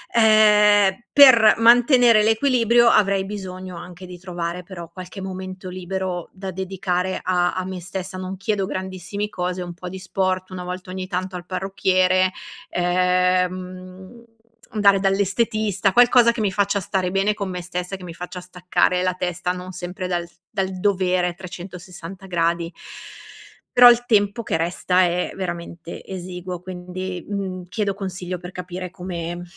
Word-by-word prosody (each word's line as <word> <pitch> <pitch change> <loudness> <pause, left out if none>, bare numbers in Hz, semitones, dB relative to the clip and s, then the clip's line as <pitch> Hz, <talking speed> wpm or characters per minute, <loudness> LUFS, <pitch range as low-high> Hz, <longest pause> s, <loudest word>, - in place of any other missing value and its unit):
Ehm, 210 -2 +5
per 255 -6 +8
mantenere 235 -1 +6
l'equilibrio 235 0 +3
avrei 195 -2 +3
bisogno 185 -2 -7
anche 180 +1 -10
di 180 -1 -10
trovare 175 -1 -5
però 175 -2 -9
qualche 185 +3 -9
momento 185 0 -7
libero 185 -1 -4
da 190 0 -7
dedicare 185 0 -2
a 180 -1 +1
a 185 0 -2
me 185 -1 -6
stessa, 185 +1 -6
non 185 +1 -5
chiedo 195 0 -1
grandissimi 190 +2 -4
cose, 180 -1 -3
un 175 -1 -6
po' 180 +1 -8
di 190 +1 -7
sport, 185 0 -2
una 180 -1 -6
volta 180 +1 -6
ogni 185 0 -5
tanto 185 0 -3
al 175 0 -7
parrucchiere, 185 0 +1 0.4
ehm, 180 0 +2
mhmm, 185 +4 -10 0.5
andare 200 -2 +4
dall'estetista, 200 0 +1
qualcosa 245 0 +6
che 235 - -7
mi 205 -3 +1
faccia 200 0 +1
stare 185 0 -2
bene 195 +2 +1
con 200 -2 -4
me 180 -1 -4
stessa 180 +2 -4
e - - -8
che 185 - -13
mi 170 - -8
faccia 180 +2 -7
staccare 180 0 0
la 185 0 +1
testa 180 0 -2
non 180 0 -8
sempre 180 +1 -5
dal, 175 -1 -2 0.2
dal 190 0 -2
dovere, 185 -2 +1
360 185 0 -9
gradi. 170 -1 0 1.0
Però 245 0 +11
il 240 0 0
tempo 205 0 +2
che 225 - -2
resta 180 +2 +1
è 180 0 0
veramente 170 -2 -6
esiguo 180 -1 -6
quindi, 180 0 -6
mhmm, 190 -2 -4
chiedo 200 0 -1
consiglio 185 -2 -5
per 180 +1 -9
capire 180 0 -6
come 175 -1 -5
185 Hz, 150 wpm, -22 LUFS, 180-195 Hz, 1.0 s, Però